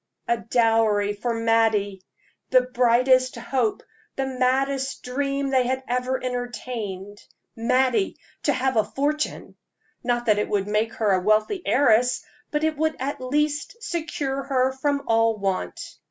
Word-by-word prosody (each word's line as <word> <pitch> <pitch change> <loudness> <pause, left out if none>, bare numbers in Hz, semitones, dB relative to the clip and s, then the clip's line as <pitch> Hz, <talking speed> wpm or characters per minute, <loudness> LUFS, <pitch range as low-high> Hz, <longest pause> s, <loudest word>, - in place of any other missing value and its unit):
"A 235 - +2
dowry 225 -3 +2
for 235 +4 -3
Mattie!" 225 -4 +1 0.5
the 255 -1 +6
brightest 255 +1 +3
hope, 235 -1 -1 0.3
the 270 - -1
maddest 265 +1 0
dream 275 +2 -2
they 255 -2 +3
had 260 +1 -1
ever 250 +1 0
entertained. 235 -5 -5 0.3
Mattie 255 - +1 0.2
to 290 - +2
have 260 -2 0
a 215 - +5
fortune! 295 +5 -2 0.5
Not 240 -1 0
that 210 -2 +3
it - - -1
would 200 -1 0
make 215 +2 0
her 215 -3 +1
a 185 -1 +2
wealthy 215 - +2
heiress, 250 -2 +3 0.2
but 300 0 -1
it 315 -1 0
would 315 +1 0
at 270 +1 -3
least 295 - -1
secure 295 -7 -3
her 265 -1 +1
from 280 +1 -1
all 225 -1 +3
want. 195 - -2
250 Hz, 140 wpm, -24 LUFS, 225-270 Hz, 0.5 s, the